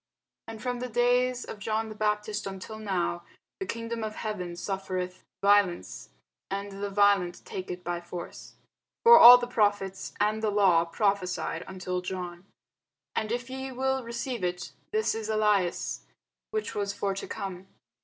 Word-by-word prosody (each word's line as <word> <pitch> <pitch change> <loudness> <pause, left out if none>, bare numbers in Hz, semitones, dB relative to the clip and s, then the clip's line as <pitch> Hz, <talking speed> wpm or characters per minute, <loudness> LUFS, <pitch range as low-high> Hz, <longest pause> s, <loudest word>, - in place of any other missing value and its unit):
And 225 -1 -7
from 245 +2 -3
the 250 0 -4
days 245 +1 +2
of 210 - -8
John 220 +2 -1
the - - -6
Baptist 210 -1 -1
until 195 +3 -7
now 180 -4 -1 0.4
the 385 - -4
kingdom 230 0 -4
of 215 0 -4
heaven 180 -5 -4
suffereth 185 -1 -4 0.2
violence, 200 -3 +2 0.4
and 200 +1 -4
the 205 - -2
violent 200 -3 +2
take 185 -1 -6
it 180 0 -6
by 175 0 -3
force. 175 0 -8 0.5
For 470 0 +10
all 245 +1 +12
the 245 - -3
prophets 205 -5 0
and 210 +1 +1
the 220 - +1
law 190 -5 +4
prophesied 185 -2 -1
until 180 -1 -3
John. 180 0 -6 0.7
And 215 0 -1
if 240 0 -2
ye 265 0 -5
will 265 +1 -1
receive 235 -1 -4
it, 180 0 -2 0.2
this 435 0 +1
is 220 -1 -4
Elias, 210 -5 +1 0.5
which 435 0 -3
was 200 -1 -2
for 200 -1 -1
to 195 - -6
come. 190 -1 -6
205 Hz, 155 wpm, -28 LUFS, 185-230 Hz, 0.7 s, all